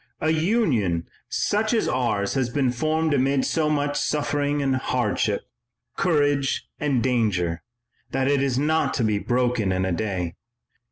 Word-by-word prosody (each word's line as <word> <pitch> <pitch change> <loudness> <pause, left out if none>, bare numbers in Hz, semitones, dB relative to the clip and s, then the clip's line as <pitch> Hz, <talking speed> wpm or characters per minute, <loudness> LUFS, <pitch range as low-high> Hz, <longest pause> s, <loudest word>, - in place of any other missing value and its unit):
A 155 - +1
Union 155 - +1 0.2
such 215 +3 +1
as 225 - +1
ours 115 -6 0
has 130 -3 0
been 130 -1 +1
formed 155 +5 0
amid 135 0 +2
so 155 -2 +1
much 145 -1 0
suffering 145 -1 0
and 135 -2 +1
hardship, 125 -4 0 0.5
courage 145 -6 +1
and 140 -5 +1
danger, 100 -9 0 0.5
that 135 0 0
it 140 -1 +2
is 135 -2 0
not 150 0 +1
to 120 - 0
be 105 -2 +1
broken 120 -4 0
in 95 0 0
a 95 - -1
day. 90 -3 -2
135 Hz, 150 wpm, -24 LUFS, 110-150 Hz, 0.5 s, amid